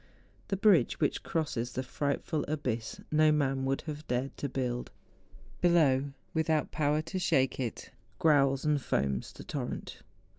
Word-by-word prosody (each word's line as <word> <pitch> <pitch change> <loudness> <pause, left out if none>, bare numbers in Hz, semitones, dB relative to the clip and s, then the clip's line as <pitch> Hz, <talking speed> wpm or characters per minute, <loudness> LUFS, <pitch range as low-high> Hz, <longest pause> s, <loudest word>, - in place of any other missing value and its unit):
The 195 - -1
bridge 195 - +4
which - - +1
crosses 125 -7 -2
the 130 - -2
frightful 140 +4 -2
abyss, 125 -7 -3
no 155 0 +5
man 135 -3 +1
would 135 0 0
have 150 -1 -7
dared 125 +2 -1
to 140 - -3
build. 125 -2 -2 0.7
Below, 150 -6 +4 0.3
without 160 -1 +1
power 150 0 +1
to 165 +4 -4
shake 135 -8 +2
it, 120 -4 -4 0.3
growls 140 -3 +3
and 150 -2 +2
foams 70 - -1
the - - -11
torrent. - - -5
145 Hz, 145 wpm, -31 LUFS, 130-155 Hz, 0.7 s, no